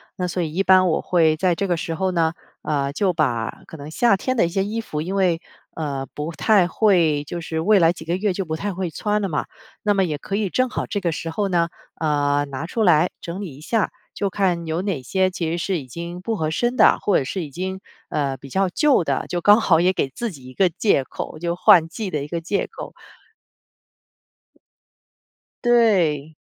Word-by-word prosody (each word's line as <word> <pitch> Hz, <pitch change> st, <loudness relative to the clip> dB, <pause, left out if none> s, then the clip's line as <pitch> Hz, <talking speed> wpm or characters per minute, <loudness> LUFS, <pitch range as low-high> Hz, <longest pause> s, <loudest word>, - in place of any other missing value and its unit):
那 180 Hz, -1 st, -2 dB
所 180 Hz, +1 st, -2 dB
以 155 Hz, -1 st, -4 dB
一 195 Hz, +3 st, +1 dB
般 185 Hz, -1 st, +5 dB
我 160 Hz, -, +1 dB
会 160 Hz, -3 st, +3 dB
在 180 Hz, 0 st, +2 dB
这 200 Hz, -, -1 dB
个 175 Hz, -2 st, 0 dB
时 165 Hz, 0 st, -3 dB
候 190 Hz, +1 st, 0 dB
呢， 165 Hz, -2 st, +1 dB, 0.3 s
呃， 140 Hz, -2 st, -1 dB
就 185 Hz, +4 st, 0 dB
把 120 Hz, -8 st, -1 dB
可 160 Hz, -, -10 dB
能 145 Hz, +1 st, -8 dB
夏 215 Hz, +4 st, +3 dB
天 255 Hz, +6 st, -2 dB
的 215 Hz, -, +3 dB
一 -, -, -2 dB
些 195 Hz, +3 st, 0 dB
衣 225 Hz, +2 st, -3 dB
服 150 Hz, -8 st, -4 dB
因 185 Hz, +4 st, -3 dB
为， 180 Hz, -4 st, +2 dB, 0.4 s
呃， 140 Hz, -4 st, -3 dB
不 150 Hz, +3 st, -5 dB
太 185 Hz, +3 st, +4 dB
会 170 Hz, -9 st, +2 dB
就 170 Hz, +4 st, -6 dB
是 160 Hz, -1 st, -3 dB
未 205 Hz, +3 st, +4 dB
来 165 Hz, 0 st, +4 dB
几 160 Hz, -, -10 dB
个 170 Hz, +3 st, -1 dB
月 205 Hz, -1 st, 0 dB
就 195 Hz, +1 st, -2 dB
不 160 Hz, -2 st, -4 dB
太 200 Hz, +1 st, -3 dB
会 180 Hz, -1 st, -3 dB
穿 210 Hz, +3 st, -1 dB
了 195 Hz, -, -1 dB
嘛。 150 Hz, -, -1 dB, 0.4 s
那 205 Hz, -1 st, +2 dB
么 195 Hz, -1 st, +2 dB
也 155 Hz, -4 st, -2 dB
可 195 Hz, -, -5 dB
以 205 Hz, -3 st, 0 dB
正 255 Hz, +5 st, +1 dB
好 -, -, -3 dB
这 205 Hz, -, -3 dB
个 170 Hz, -4 st, -1 dB
时 165 Hz, -, -4 dB
候 200 Hz, +5 st, -1 dB
呢， 170 Hz, -2 st, +1 dB, 0.3 s
呃， 145 Hz, -2 st, +1 dB
拿 135 Hz, +3 st, -5 dB
出 220 Hz, +6 st, -1 dB
来 175 Hz, -2 st, +4 dB
整 170 Hz, +2 st, -6 dB
理 180 Hz, -9 st, -6 dB
一 140 Hz, -, -14 dB
下， 215 Hz, +6 st, 0 dB, 0.2 s
就 200 Hz, -, -1 dB
看 180 Hz, -4 st, 0 dB
有 160 Hz, +3 st, -1 dB
哪 190 Hz, -9 st, -2 dB
些 185 Hz, +8 st, +1 dB
其 170 Hz, -3 st, -3 dB
实 170 Hz, -, -1 dB
是 175 Hz, 0 st, -1 dB
已 130 Hz, -, -10 dB
经 170 Hz, +6 st, -7 dB
不 220 Hz, +4 st, -2 dB
合 155 Hz, -4 st, -1 dB
身 240 Hz, +8 st, 0 dB
的， -, -, +5 dB
或 200 Hz, -, +2 dB
者 -, -, 0 dB
是 180 Hz, +7 st, -3 dB
已 -, -, -10 dB
经， 190 Hz, +6 st, -4 dB, 0.3 s
呃， 140 Hz, -3 st, -1 dB
比 135 Hz, +2 st, -12 dB
较 190 Hz, +7 st, +1 dB
旧 265 Hz, -, +2 dB
的， 140 Hz, -3 st, -1 dB
就 175 Hz, -, -1 dB
刚 205 Hz, +5 st, +6 dB
好 165 Hz, -6 st, +4 dB
也 180 Hz, +2 st, +3 dB
给 135 Hz, -, -1 dB
自 235 Hz, -, -4 dB
己 130 Hz, -5 st, -13 dB
一 130 Hz, -, -12 dB
个 190 Hz, -, +3 dB
借 170 Hz, -5 st, +1 dB
口， 155 Hz, -, -7 dB
就 170 Hz, +1 st, -2 dB
换 170 Hz, -2 st, +6 dB
季 190 Hz, +4 st, -5 dB
的 150 Hz, -, -1 dB
一 -, -, -9 dB
个 170 Hz, +2 st, -4 dB
借 195 Hz, +4 st, -1 dB
口。 -, -, -9 dB, 2.7 s
对。 180 Hz, -11 st, +3 dB
175 Hz, 245 characters per minute, -22 LUFS, 155-195 Hz, 2.7 s, 刚